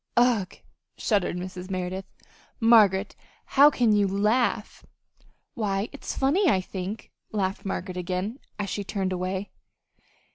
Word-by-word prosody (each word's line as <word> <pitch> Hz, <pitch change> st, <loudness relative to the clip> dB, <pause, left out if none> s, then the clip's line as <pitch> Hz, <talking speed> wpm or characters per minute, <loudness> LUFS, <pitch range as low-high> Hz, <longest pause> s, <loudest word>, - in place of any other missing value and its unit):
'" -, -, -32 dB
"Ugh!" 240 Hz, -6 st, +3 dB, 0.4 s
shuddered 200 Hz, -5 st, 0 dB
Mrs. 180 Hz, +1 st, -7 dB
Merideth. 185 Hz, 0 st, -3 dB, 0.5 s
"Margaret, 210 Hz, -4 st, +5 dB, 0.3 s
how 285 Hz, +2 st, +6 dB
can 245 Hz, -6 st, +2 dB
you 205 Hz, -1 st, +3 dB
laugh!" 210 Hz, +3 st, 0 dB, 0.7 s
"Why, 205 Hz, -4 st, -1 dB
it's 280 Hz, -, -6 dB
funny, 320 Hz, +8 st, +3 dB
I 190 Hz, -, +3 dB
think," 190 Hz, +3 st, -6 dB, 0.2 s
laughed 195 Hz, -2 st, -2 dB
Margaret 185 Hz, -1 st, -4 dB
again, 185 Hz, +7 st, -3 dB, 0.2 s
as 205 Hz, -1 st, -2 dB
she 205 Hz, -, -2 dB
turned 195 Hz, -2 st, -2 dB
away. 185 Hz, +2 st, -3 dB
200 Hz, 130 wpm, -26 LUFS, 185-225 Hz, 0.7 s, how